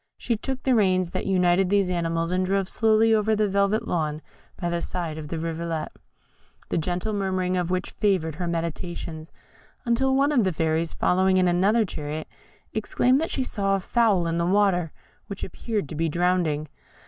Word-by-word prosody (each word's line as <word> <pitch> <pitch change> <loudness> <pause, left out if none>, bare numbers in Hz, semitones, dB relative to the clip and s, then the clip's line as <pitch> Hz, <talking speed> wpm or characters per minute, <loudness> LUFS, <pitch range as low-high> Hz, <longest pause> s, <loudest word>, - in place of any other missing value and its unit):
She 235 - -1
took 265 +4 -4
the 260 - +3
reins 185 -5 +2
that - - -3
united 180 -1 +3
these 200 -2 +2
animals 165 -1 -1
and 185 +1 +1
drove 195 0 0
slowly 225 +1 +3
over 220 0 +2
the 210 0 +2
velvet 200 +2 +1
lawn 155 -3 -2 0.4
by 175 - -2
the 170 0 -1
side 165 -4 -4
of 150 - -7
the 165 - -4
rivulet, 165 -1 -3 0.8
the - - 0
gentle 180 +6 -2
murmuring 185 -2 -1
of 180 -1 -1
which 185 0 -2
favoured 185 -6 0
her 175 +3 -4
meditations, 165 -1 -4 0.5
until 265 +3 +2
one 280 +2 +3
of 255 -6 +3
the 190 - +1
fairies, 160 +1 0
following 185 +1 +2
in 185 -1 +3
another 200 +6 +3
chariot, 155 -3 -5 0.5
exclaimed 250 +5 +2
that 325 - -1
she 265 - -1
saw 195 -5 0
a - - -1
fowl 205 -3 +2
in 165 0 -1
the 170 - +1
water, 185 -4 +2 0.4
which 200 -2 -6
appeared 210 - -3
to - - -6
be 165 +1 0
drowning. 170 -3 0
185 Hz, 185 wpm, -25 LUFS, 165-205 Hz, 0.8 s, the